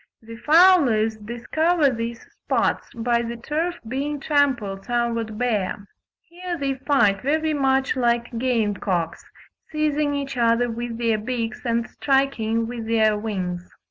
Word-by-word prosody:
The 230 Hz, +1 st, -10 dB
fowlers 280 Hz, -7 st, +5 dB
discover 275 Hz, +8 st, +1 dB
these 235 Hz, 0 st, -5 dB
spots -, -, -1 dB
by 235 Hz, 0 st, 0 dB
the 235 Hz, 0 st, -5 dB
turf 315 Hz, +8 st, -2 dB
being 280 Hz, +4 st, -3 dB
trampled 260 Hz, -10 st, 0 dB
somewhat 230 Hz, -2 st, -1 dB
bare. 210 Hz, -4 st, -1 dB, 0.4 s
Here 350 Hz, +1 st, -5 dB
they 275 Hz, -2 st, -1 dB
fight 260 Hz, -8 st, +2 dB
very 310 Hz, +3 st, 0 dB
much 270 Hz, -1 st, +1 dB
like 235 Hz, -1 st, 0 dB
game 230 Hz, -5 st, +1 dB
cocks, 175 Hz, -4 st, -2 dB, 0.5 s
seizing 300 Hz, -1 st, 0 dB
each 275 Hz, -2 st, -4 dB
other 235 Hz, 0 st, +2 dB
with 235 Hz, 0 st, -5 dB
their 230 Hz, -2 st, +1 dB
beaks 240 Hz, +1 st, -4 dB
and 235 Hz, 0 st, 0 dB
striking 255 Hz, -5 st, 0 dB
with 230 Hz, -1 st, -6 dB
their 220 Hz, -2 st, +3 dB
wings. 185 Hz, -5 st, -4 dB
240 Hz, 135 wpm, -23 LUFS, 225-280 Hz, 0.5 s, fowlers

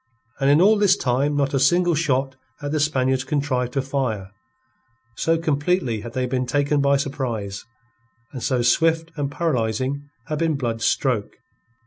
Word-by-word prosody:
And 135 Hz, -, +2 dB
in 145 Hz, +3 st, +5 dB
all 210 Hz, +3 st, +5 dB
this 200 Hz, -1 st, +4 dB
time 135 Hz, +2 st, 0 dB
not 140 Hz, -1 st, 0 dB
a 135 Hz, -, +2 dB
single 175 Hz, +6 st, +3 dB
shot 135 Hz, -4 st, 0 dB, 0.2 s
had 145 Hz, -1 st, -4 dB
the 155 Hz, -, 0 dB
Spaniards 130 Hz, -3 st, +1 dB
contrived 130 Hz, -3 st, -1 dB
to 135 Hz, -, 0 dB
fire, 125 Hz, -8 st, -2 dB, 0.8 s
so 165 Hz, +7 st, +1 dB
completely 150 Hz, -, 0 dB
had 115 Hz, +1 st, -8 dB
they 130 Hz, -1 st, -1 dB
been 125 Hz, 0 st, -2 dB
taken 145 Hz, +2 st, +1 dB
by 140 Hz, 0 st, +3 dB
surprise, 120 Hz, -8 st, -4 dB, 0.7 s
and 130 Hz, -, -7 dB
so 125 Hz, -1 st, 0 dB
swift 165 Hz, +6 st, +2 dB
and 145 Hz, -3 st, -2 dB
paralyzing 140 Hz, -2 st, -1 dB, 0.2 s
had 155 Hz, -2 st, -3 dB
been 165 Hz, -2 st, +1 dB
Blood's 115 Hz, -4 st, -2 dB
stroke. 120 Hz, -7 st, 0 dB
140 Hz, 160 wpm, -22 LUFS, 125-150 Hz, 0.8 s, in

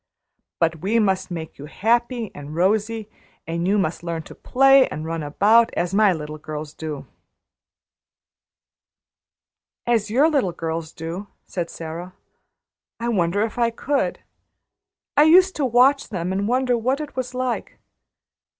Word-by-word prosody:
But 165 Hz, 0 st, +1 dB
we 195 Hz, +8 st, 0 dB
must 190 Hz, -4 st, +1 dB
make 165 Hz, -4 st, -7 dB
you 145 Hz, -, -8 dB
happy 235 Hz, -, 0 dB
and 145 Hz, +1 st, -9 dB
rosy, 210 Hz, +4 st, 0 dB, 0.4 s
and 170 Hz, +2 st, -2 dB
you 205 Hz, +2 st, +3 dB
must 165 Hz, -5 st, -1 dB
learn 170 Hz, -2 st, -4 dB
to -, -, -12 dB
play 270 Hz, +1 st, +4 dB
and 155 Hz, -, -6 dB
run 165 Hz, 0 st, -3 dB
about, 210 Hz, +10 st, +4 dB
as 175 Hz, +1 st, -1 dB
my 210 Hz, 0 st, +5 dB
little 155 Hz, -2 st, -5 dB
girls 150 Hz, 0 st, -7 dB
do 155 Hz, -3 st, -6 dB, 1.0 s
" -, -, -71 dB, 1.3 s
"As 225 Hz, -3 st, +1 dB
your 265 Hz, +8 st, +4 dB
little 275 Hz, -, +1 dB
girls 165 Hz, -1 st, -4 dB
do?" 170 Hz, +5 st, -6 dB, 0.2 s
said 175 Hz, -2 st, -4 dB
Sara. 170 Hz, +3 st, -7 dB, 0.8 s
"I 235 Hz, +1 st, -2 dB
wonder 195 Hz, -1 st, +1 dB
if 225 Hz, +2 st, -4 dB
I 235 Hz, -1 st, +3 dB
could. 275 Hz, +4 st, -1 dB, 0.9 s
I 295 Hz, +1 st, +6 dB
used 370 Hz, +4 st, +6 dB
to 290 Hz, -, +1 dB
watch 255 Hz, +4 st, +4 dB
them 180 Hz, -3 st, -3 dB
and 195 Hz, +2 st, -1 dB
wonder 250 Hz, +1 st, +2 dB
what 255 Hz, +4 st, 0 dB
it 300 Hz, -3 st, -7 dB
was 255 Hz, -1 st, -4 dB
like. 255 Hz, -1 st, -3 dB
200 Hz, 150 wpm, -22 LUFS, 165-240 Hz, 1.3 s, I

